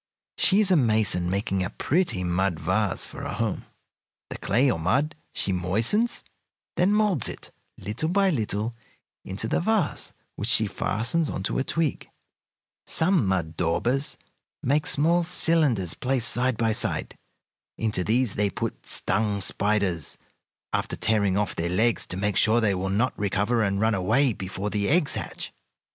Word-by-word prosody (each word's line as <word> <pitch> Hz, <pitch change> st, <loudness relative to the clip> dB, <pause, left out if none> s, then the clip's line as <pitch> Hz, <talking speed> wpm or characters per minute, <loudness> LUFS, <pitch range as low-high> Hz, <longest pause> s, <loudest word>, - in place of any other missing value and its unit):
She 195 Hz, +1 st, +4 dB
is 195 Hz, -3 st, +4 dB
a -, -, +6 dB
mason, 110 Hz, -, +2 dB
making 95 Hz, 0 st, -1 dB
a 90 Hz, -, -3 dB
pretty 160 Hz, -, 0 dB
mud 90 Hz, -1 st, 0 dB
vase -, -, 0 dB
for -, -, -8 dB
a -, -, -4 dB
home. -, -, -2 dB, 0.7 s
The -, -, -6 dB
clay, 125 Hz, +6 st, +2 dB
or 80 Hz, -, -2 dB
mud, 130 Hz, -, +1 dB, 0.2 s
she 100 Hz, -, -2 dB
moistens, 110 Hz, -, +1 dB, 0.5 s
then 180 Hz, +3 st, +2 dB
moulds 210 Hz, -, +2 dB
it, -, -, -8 dB, 0.3 s
little 120 Hz, +10 st, -3 dB
by 195 Hz, +1 st, +3 dB
little, 110 Hz, -, -2 dB, 0.5 s
into 95 Hz, +4 st, -3 dB
the -, -, 0 dB
vase, 215 Hz, +2 st, 0 dB, 0.3 s
which -, -, -3 dB
she -, -, +3 dB
fastens 125 Hz, +9 st, 0 dB
on 95 Hz, -, -4 dB
to -, -, -1 dB
a -, -, +1 dB
twig. 160 Hz, 0 st, -2 dB, 0.8 s
Some 165 Hz, -, +2 dB
mud 85 Hz, -4 st, -1 dB
daubers 120 Hz, -, +1 dB, 0.5 s
make 145 Hz, +4 st, +1 dB
small 170 Hz, +4 st, +3 dB
cylinders 155 Hz, -, +2 dB
placed 125 Hz, -2 st, +1 dB
side 125 Hz, -1 st, +1 dB
by 115 Hz, -1 st, +1 dB
side. -, -, -1 dB, 0.6 s
Into 105 Hz, -4 st, 0 dB
these 115 Hz, +2 st, +1 dB
they 100 Hz, 0 st, 0 dB
put -, -, -5 dB
stung 105 Hz, -1 st, 0 dB
spiders, 100 Hz, -4 st, 0 dB, 0.6 s
after -, -, -1 dB
tearing 100 Hz, -3 st, +1 dB
off 105 Hz, -1 st, -1 dB
their 85 Hz, +1 st, -2 dB
legs 110 Hz, +6 st, +1 dB
to 90 Hz, -, -6 dB
make 100 Hz, 0 st, -1 dB
sure 110 Hz, +4 st, +4 dB
they 110 Hz, -4 st, +2 dB
will 95 Hz, +1 st, -2 dB
not 110 Hz, +7 st, +1 dB
recover 105 Hz, +4 st, 0 dB
and 100 Hz, -2 st, 0 dB
run 110 Hz, +2 st, +2 dB
away 115 Hz, +7 st, +2 dB
before 95 Hz, +1 st, -5 dB
the 100 Hz, -1 st, 0 dB
eggs 155 Hz, -1 st, +2 dB
hatch. -, -, -6 dB
110 Hz, 160 wpm, -25 LUFS, 95-140 Hz, 0.8 s, a